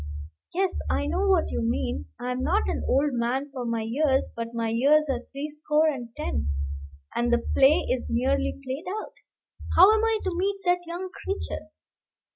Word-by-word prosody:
Yes; 375 Hz, +1 st, 0 dB
I -, -, +1 dB
know 395 Hz, +1 st, 0 dB
what 375 Hz, -4 st, +3 dB
you -, -, -1 dB
mean. 85 Hz, -, -1 dB
I 250 Hz, -, -3 dB
am 250 Hz, +1 st, -2 dB
not 395 Hz, +10 st, +1 dB
an -, -, -2 dB
old 280 Hz, +1 st, +2 dB
man 250 Hz, +4 st, -1 dB
for 255 Hz, -3 st, -5 dB
my 230 Hz, -1 st, -1 dB
years; 265 Hz, +4 st, +1 dB
but 230 Hz, 0 st, -3 dB
my 230 Hz, -1 st, 0 dB
years 280 Hz, +7 st, +4 dB
are 250 Hz, -, -1 dB
threescore 300 Hz, +2 st, +1 dB
and 250 Hz, -5 st, -4 dB
ten, 70 Hz, +1 st, -2 dB, 0.7 s
and 240 Hz, 0 st, +1 dB
the 240 Hz, 0 st, +2 dB
play 275 Hz, +3 st, +5 dB
is 255 Hz, -, -1 dB
nearly 260 Hz, +5 st, 0 dB
played 265 Hz, +5 st, -4 dB
out. -, -, -9 dB, 0.6 s
How 395 Hz, +4 st, +9 dB
am 440 Hz, 0 st, +2 dB
I 450 Hz, -1 st, +3 dB
to 375 Hz, -2 st, -2 dB
meet 390 Hz, +3 st, 0 dB
that 355 Hz, 0 st, +3 dB
young 360 Hz, +2 st, -5 dB
creature? 390 Hz, +1 st, -5 dB
275 Hz, 180 wpm, -26 LUFS, 240-345 Hz, 0.7 s, How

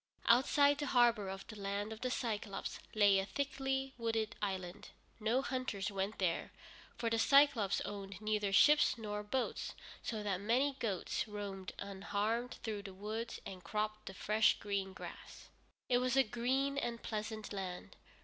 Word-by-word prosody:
Outside 285 Hz, +4 st, +5 dB
the 290 Hz, -, -1 dB
harbor 235 Hz, -6 st, +4 dB
of 195 Hz, 0 st, -6 dB
the 215 Hz, -, -9 dB
Land 200 Hz, +2 st, -2 dB
of 220 Hz, -, -11 dB
the 255 Hz, -, 0 dB
Cyclôpes 215 Hz, -5 st, -3 dB, 0.2 s
lay 205 Hz, -2 st, +6 dB
a 195 Hz, -, -1 dB
thickly 270 Hz, 0 st, -2 dB
wooded 225 Hz, -2 st, -1 dB
island. 190 Hz, -1 st, -3 dB, 0.3 s
No 230 Hz, +5 st, +1 dB
hunters 255 Hz, -7 st, -2 dB
went 195 Hz, +2 st, -2 dB
there, 180 Hz, -3 st, 0 dB, 0.5 s
for 230 Hz, -1 st, -1 dB
the 230 Hz, -, +2 dB
Cyclôpes 275 Hz, -7 st, +5 dB
owned 195 Hz, -2 st, -6 dB
neither 210 Hz, -2 st, 0 dB
ships 295 Hz, +7 st, +6 dB
nor 210 Hz, -2 st, -3 dB
boats, 245 Hz, +5 st, -2 dB, 0.3 s
so 220 Hz, -2 st, -3 dB
that 195 Hz, -2 st, -1 dB
many 250 Hz, +7 st, +2 dB
goats 205 Hz, -1 st, -1 dB
roamed 200 Hz, -3 st, -5 dB
unharmed 205 Hz, +4 st, -2 dB
through 215 Hz, -2 st, -3 dB
the 195 Hz, -2 st, -9 dB
woods 215 Hz, +4 st, -4 dB
and 185 Hz, -2 st, -8 dB
cropped 215 Hz, +3 st, -2 dB
the 190 Hz, -, -6 dB
fresh 215 Hz, +3 st, +3 dB
green 200 Hz, -2 st, -2 dB
grass. -, -, -10 dB, 0.4 s
It 245 Hz, -1 st, +4 dB
was 255 Hz, +1 st, +1 dB
a 270 Hz, -, +7 dB
green 265 Hz, +4 st, 0 dB
and 235 Hz, -3 st, -3 dB
pleasant 215 Hz, -1 st, -4 dB
land. 180 Hz, -, -5 dB
215 Hz, 160 wpm, -36 LUFS, 200-245 Hz, 0.5 s, a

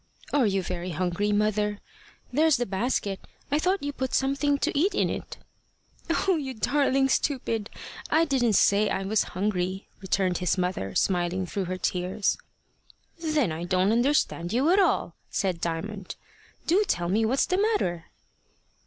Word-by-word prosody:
"Are 275 Hz, -6 st, +4 dB
you 195 Hz, -2 st, 0 dB
very 180 Hz, 0 st, -4 dB
hungry, 185 Hz, +5 st, 0 dB
mother? 210 Hz, 0 st, +1 dB, 0.6 s
There's 310 Hz, +1 st, +4 dB
the 245 Hz, -, -1 dB
basket. 200 Hz, -1 st, -1 dB, 0.3 s
I 295 Hz, -, +3 dB
thought 370 Hz, +1 st, 0 dB
you 285 Hz, 0 st, -2 dB
put 260 Hz, -2 st, -2 dB
something 280 Hz, +2 st, +1 dB
to -, -, -1 dB
eat 375 Hz, +8 st, +2 dB
in -, -, +1 dB
it." -, -, -6 dB, 0.9 s
"O 375 Hz, -3 st, +4 dB
you 265 Hz, -4 st, -4 dB
darling 270 Hz, +3 st, +2 dB
stupid! 240 Hz, -6 st, -1 dB, 0.4 s
I 325 Hz, +1 st, +4 dB
didn't 255 Hz, -7 st, +2 dB
say 205 Hz, +3 st, +4 dB
I 195 Hz, -, -1 dB
was 205 Hz, +2 st, +2 dB, 0.2 s
hungry," 190 Hz, -1 st, -1 dB
returned 190 Hz, -2 st, 0 dB
his 180 Hz, 0 st, 0 dB
mother, 180 Hz, -, -2 dB
smiling 180 Hz, 0 st, +1 dB
through 190 Hz, +2 st, -3 dB
her 185 Hz, +1 st, -3 dB
tears. 185 Hz, +3 st, 0 dB, 0.8 s
"Then 310 Hz, -, +1 dB
I 160 Hz, +2 st, -4 dB
don't 185 Hz, +3 st, +2 dB
understand 235 Hz, -8 st, +1 dB
you 270 Hz, +8 st, +2 dB
at 385 Hz, -, +5 dB
all," 385 Hz, -, +2 dB, 0.2 s
said 185 Hz, -4 st, -1 dB
Diamond. 185 Hz, +4 st, -4 dB, 0.5 s
"Do 380 Hz, +5 st, +3 dB
tell 175 Hz, -, 0 dB
me 210 Hz, +5 st, +2 dB
what's 250 Hz, +5 st, +2 dB
the 365 Hz, +1 st, 0 dB
matter." 185 Hz, -, 0 dB
210 Hz, 155 wpm, -26 LUFS, 185-280 Hz, 0.9 s, at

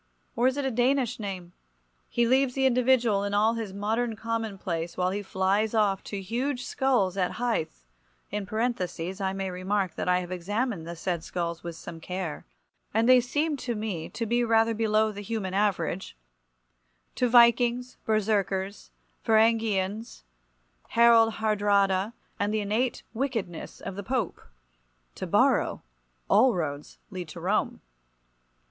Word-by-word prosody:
Or 245 Hz, 0 st, +3 dB
is 260 Hz, +2 st, 0 dB
it 285 Hz, -, -1 dB
a 265 Hz, -, 0 dB
Danish 250 Hz, +1 st, +1 dB
name? 185 Hz, -4 st, -6 dB, 0.6 s
He 240 Hz, -, +2 dB
leaves 260 Hz, +1 st, +2 dB
the 270 Hz, -1 st, +2 dB
individual 245 Hz, -5 st, +3 dB
in 200 Hz, 0 st, -1 dB
all 215 Hz, +2 st, +3 dB
his 225 Hz, -4 st, -4 dB
modern 220 Hz, +4 st, -1 dB
commonplace 200 Hz, -7 st, -3 dB
while 180 Hz, 0 st, +1 dB
he 205 Hz, +2 st, -2 dB
flies 200 Hz, +3 st, 0 dB
off 200 Hz, -3 st, +2 dB
to 200 Hz, -, -4 dB
huge 245 Hz, +5 st, -2 dB
skulls 245 Hz, -9 st, +1 dB
at 180 Hz, -2 st, 0 dB
Hythe 220 Hz, -, -2 dB, 0.5 s
(in 205 Hz, -1 st, -3 dB
parenthesis 190 Hz, -5 st, -2 dB
I 190 Hz, 0 st, 0 dB
may 195 Hz, -1 st, -3 dB
remark 185 Hz, 0 st, -1 dB
that -, -, -3 dB
I 180 Hz, -, +4 dB
have 180 Hz, 0 st, -8 dB
examined 200 Hz, 0 st, -2 dB
the 170 Hz, -, -5 dB
said 170 Hz, 0 st, -3 dB
skulls 170 Hz, -2 st, -4 dB
with 170 Hz, -1 st, -6 dB
some 165 Hz, 0 st, -9 dB
care, 180 Hz, -, -5 dB, 0.5 s
and 225 Hz, +1 st, +3 dB
they 255 Hz, -1 st, +7 dB
seemed 290 Hz, +4 st, -1 dB
to 240 Hz, -2 st, -3 dB
me 210 Hz, -7 st, -4 dB
to 230 Hz, -, -4 dB
be 240 Hz, +2 st, +1 dB
rather 225 Hz, 0 st, +3 dB
below 220 Hz, 0 st, +2 dB
the 205 Hz, 0 st, -7 dB
human 205 Hz, -3 st, -3 dB
average), 190 Hz, -, -1 dB, 1.0 s
to 250 Hz, -, +1 dB
Vikings, 240 Hz, +1 st, +4 dB
Berserkers, 200 Hz, -2 st, 0 dB, 0.3 s
Varangians, 220 Hz, -, +1 dB, 0.7 s
Harald 230 Hz, -1 st, +6 dB
Haardraada, 205 Hz, -1 st, +2 dB, 0.3 s
and 205 Hz, +1 st, 0 dB
the 215 Hz, 0 st, 0 dB
innate 220 Hz, +5 st, -1 dB
wickedness 225 Hz, -, -3 dB
of 190 Hz, -, -6 dB
the 200 Hz, -, -4 dB
Pope. 235 Hz, -1 st, -2 dB, 0.7 s
To -, -, -6 dB
Borrow -, -, +2 dB, 0.4 s
all 230 Hz, +4 st, +5 dB
roads 145 Hz, -4 st, -4 dB
lead 180 Hz, -3 st, -5 dB
to 155 Hz, +2 st, -9 dB
Rome. 190 Hz, +5 st, 0 dB
210 Hz, 150 wpm, -27 LUFS, 190-235 Hz, 1.0 s, they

